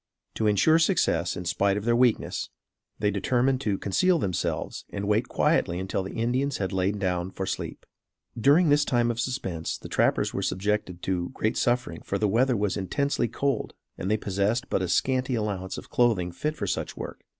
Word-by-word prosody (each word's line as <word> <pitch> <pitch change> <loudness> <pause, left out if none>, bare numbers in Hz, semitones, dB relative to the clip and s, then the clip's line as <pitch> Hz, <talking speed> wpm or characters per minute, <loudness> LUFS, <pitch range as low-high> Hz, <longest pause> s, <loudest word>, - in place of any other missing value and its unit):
To 110 - 0
insure 155 +11 +4
success 165 - +1
in 90 - -5
spite 100 +3 +1
of 105 - -4
their 120 0 +3
weakness, 120 -2 +1 0.5
they 105 -1 +1
determined 125 +6 +1
to 105 -6 0
conceal 175 - +2
themselves 95 - -2
and 100 0 -4
wait 110 +4 +2
quietly 85 - +1
until 95 +1 -2
the 95 - -6
Indians 125 +4 0
had 95 -2 -2
lain 95 +2 0
down 90 -2 -1
for 95 0 -4
sleep. 95 - -5 0.5
During 145 +8 +4
this 145 0 +5
time 120 -3 +2
of 115 - -5
suspense 95 -10 -3
the - - -10
trappers - - +1
were - - -2
subjected 95 -2 -1
to 90 -2 -1
great 110 - 0
suffering 120 +3 0
for - - -2
the 105 - +1
weather 120 +4 +2
was 100 -2 0
intensely 120 +6 0
cold 140 +5 -2 0.2
and 95 - -4
they 110 - +3
possessed 100 +4 -1
but - - +1
a 95 - -1
scanty 130 +7 +1
allowance 100 -4 -3
of - - -10
clothing 110 -8 +2
fit 150 - -3
for - - -3
such - - -3
work. - - -7
105 Hz, 190 wpm, -26 LUFS, 95-125 Hz, 0.5 s, this